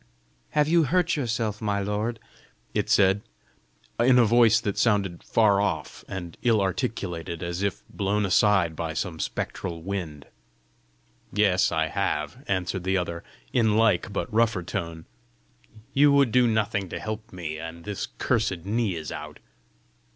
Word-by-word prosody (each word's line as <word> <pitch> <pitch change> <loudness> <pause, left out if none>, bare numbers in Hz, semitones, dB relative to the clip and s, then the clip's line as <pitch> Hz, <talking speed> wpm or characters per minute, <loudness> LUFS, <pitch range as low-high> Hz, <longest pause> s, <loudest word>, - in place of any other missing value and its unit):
"Have 150 0 +4
you 165 0 +4
hurt 175 +4 +2
yourself, 115 -6 -2
my 100 -2 0
lord?" 105 +3 -2 0.5
it - - -1
said, 95 0 +4 0.8
in 125 +2 +5
a 120 - +6
voice 115 0 +5
that 105 -3 -2
sounded 100 -6 +1
far 105 -3 +3
off, 105 - -3
and 90 -4 -7
ill 115 -3 +3
articulated 95 - -3
as 85 +1 -3
if 100 -1 -2
blown 100 +1 -1
aside 95 -3 +3
by 80 0 -4
some 85 -2 -3
spectral 85 -3 -4
wind. 85 -7 -5 1.1
"Yes, 100 -2 +3
I 80 0 +1
have," 80 - -2
answered 95 -1 -1
the 95 +1 +1
other, 85 -2 -3 0.3
in 110 -2 +3
like 110 -2 +2
but 100 - -3
rougher 110 -5 +2
tone. 85 -1 -5 0.9
"You 145 +1 +5
would 140 -4 +4
do 125 0 +4
nothing 105 -4 0
to - - -5
help 110 +1 -6
me, 80 -4 -5
and 80 +1 -8
this 100 0 -4
cursed 100 -8 0
knee 105 -2 0
is 80 -2 -6
out!" - - -7
100 Hz, 150 wpm, -26 LUFS, 85-115 Hz, 1.1 s, a